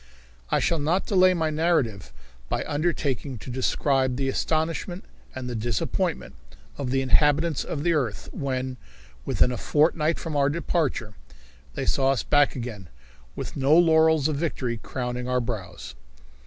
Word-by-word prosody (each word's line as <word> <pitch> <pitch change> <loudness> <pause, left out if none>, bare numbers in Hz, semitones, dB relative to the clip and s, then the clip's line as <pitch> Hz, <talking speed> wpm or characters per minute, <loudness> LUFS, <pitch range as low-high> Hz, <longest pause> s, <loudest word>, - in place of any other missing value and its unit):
I - - +2
shall 170 - +1
not 165 +6 +1
delay 185 -2 +4
my 160 -2 0
narrative 140 - 0 0.4
by - - -1
undertaking 145 -4 -1
to 125 - -8
describe 130 +1 +1
the 135 +1 -1
astonishment 165 +6 -1 0.3
and 130 -1 -5
the 125 - -4
disappointment 100 - -2 0.4
of 135 -3 -4
the 135 +1 +1
inhabitants 150 +3 +3
of 145 -2 -4
the 170 0 +2
earth 125 -9 -2
when, 130 -2 -3 0.5
within 125 - +2
a 125 - -3
fortnight 155 +1 +2
from 160 -3 -5
our 140 -1 +3
departure, 150 -8 -1 0.6
they - - -2
saw 135 -1 +2
us 135 -4 +1
back 145 -1 +3
again, 115 -8 -6 0.5
with - - -6
no 140 +3 +4
laurels 160 -3 +5
of 155 -2 -1
victory 130 -7 -2
crowning 125 +1 -4
our 125 0 +2
brows. 95 - -6
140 Hz, 150 wpm, -25 LUFS, 125-160 Hz, 0.6 s, laurels